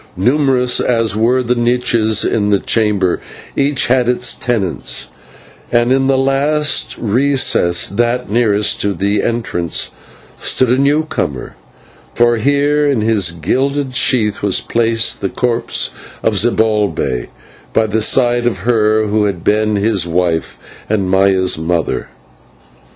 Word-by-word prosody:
Numerous 125 Hz, +3 st, +1 dB
as 115 Hz, -4 st, 0 dB
were 120 Hz, +4 st, +1 dB
the 120 Hz, 0 st, 0 dB
niches 120 Hz, -3 st, +1 dB
in 105 Hz, -2 st, 0 dB
the 100 Hz, -, +3 dB
chamber, 100 Hz, -4 st, 0 dB, 0.4 s
each 140 Hz, -1 st, +1 dB
had 125 Hz, -1 st, +1 dB
its 125 Hz, 0 st, +1 dB
tenants; 110 Hz, -9 st, -2 dB, 0.6 s
and 120 Hz, +1 st, +2 dB
in 135 Hz, 0 st, +1 dB
the 135 Hz, -1 st, +2 dB
last 140 Hz, +2 st, +1 dB
recess 120 Hz, -7 st, +1 dB
that 120 Hz, +5 st, -1 dB
nearest 105 Hz, -2 st, +1 dB
to 100 Hz, -1 st, -1 dB
the 100 Hz, +3 st, 0 dB
entrance 110 Hz, -8 st, -2 dB, 0.5 s
stood 130 Hz, -, +1 dB
a 125 Hz, -, +2 dB
new 145 Hz, +3 st, +1 dB
comer; 70 Hz, -, -4 dB, 0.6 s
for 120 Hz, 0 st, +3 dB
here 145 Hz, +4 st, +1 dB
in 130 Hz, -6 st, 0 dB
his 105 Hz, -5 st, +2 dB
gilded 130 Hz, -, -2 dB
sheath 110 Hz, -5 st, +1 dB
was 100 Hz, -2 st, +1 dB
placed 115 Hz, -1 st, 0 dB
the 100 Hz, -, -1 dB
corpse 120 Hz, +1 st, -1 dB, 0.3 s
of 110 Hz, -, +1 dB
Zibalbay, 105 Hz, -, 0 dB, 0.4 s
by 110 Hz, -, +1 dB
the 110 Hz, +1 st, -1 dB
side 120 Hz, +1 st, +2 dB
of 100 Hz, -7 st, -2 dB
her 110 Hz, -1 st, +1 dB
who 105 Hz, 0 st, 0 dB
had 95 Hz, -4 st, -3 dB
been 105 Hz, 0 st, +1 dB
his 100 Hz, -3 st, 0 dB
wife 85 Hz, -1 st, -1 dB, 0.3 s
and 100 Hz, -3 st, -1 dB
Maya's 95 Hz, -3 st, +2 dB
mother. 80 Hz, 0 st, -2 dB
115 Hz, 135 wpm, -15 LUFS, 100-125 Hz, 0.6 s, the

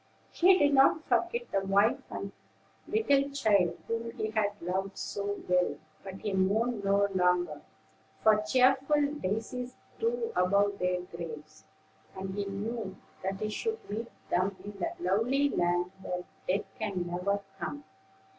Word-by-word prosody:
He 365 Hz, +2 st, +6 dB
did 290 Hz, -4 st, +4 dB
not 275 Hz, +3 st, +5 dB
forget 480 Hz, 0 st, 0 dB
the 195 Hz, -, +1 dB
wife 200 Hz, +3 st, +3 dB
and -, -, -5 dB, 0.6 s
little 285 Hz, -11 st, +2 dB
child 210 Hz, -10 st, +2 dB
whom 230 Hz, 0 st, -2 dB
he 215 Hz, -, -2 dB
had 205 Hz, -2 st, 0 dB
loved 190 Hz, +3 st, -2 dB
so 205 Hz, 0 st, -3 dB
well; 180 Hz, 0 st, +2 dB, 0.3 s
but 190 Hz, -1 st, -7 dB
he 210 Hz, -, -2 dB
mourned 205 Hz, +4 st, +1 dB
no 200 Hz, +1 st, +3 dB
longer, 180 Hz, -4 st, +2 dB, 0.6 s
for 215 Hz, -1 st, +5 dB
cheerful 265 Hz, +5 st, +3 dB, 0.2 s
daisies 230 Hz, +6 st, -3 dB, 0.2 s
grew 460 Hz, 0 st, 0 dB
above 200 Hz, +2 st, +3 dB
their 180 Hz, 0 st, +1 dB
graves, 155 Hz, -3 st, -9 dB, 0.5 s
and 190 Hz, 0 st, -5 dB
he 200 Hz, 0 st, -2 dB
knew 205 Hz, +1 st, -4 dB, 0.3 s
that 190 Hz, +1 st, -3 dB
he 215 Hz, -, -1 dB
should 445 Hz, -, -3 dB
meet 225 Hz, +3 st, -3 dB, 0.2 s
them 185 Hz, +2 st, +1 dB
in 205 Hz, -1 st, -8 dB
the 175 Hz, -, -1 dB
lovely 225 Hz, +11 st, +2 dB
land 175 Hz, -4 st, +1 dB
where 180 Hz, -1 st, -3 dB, 0.2 s
death 195 Hz, +3 st, +1 dB
can 185 Hz, -4 st, -2 dB
never 180 Hz, +3 st, -1 dB, 0.2 s
come. 290 Hz, 0 st, -4 dB
200 Hz, 145 wpm, -30 LUFS, 185-245 Hz, 0.6 s, He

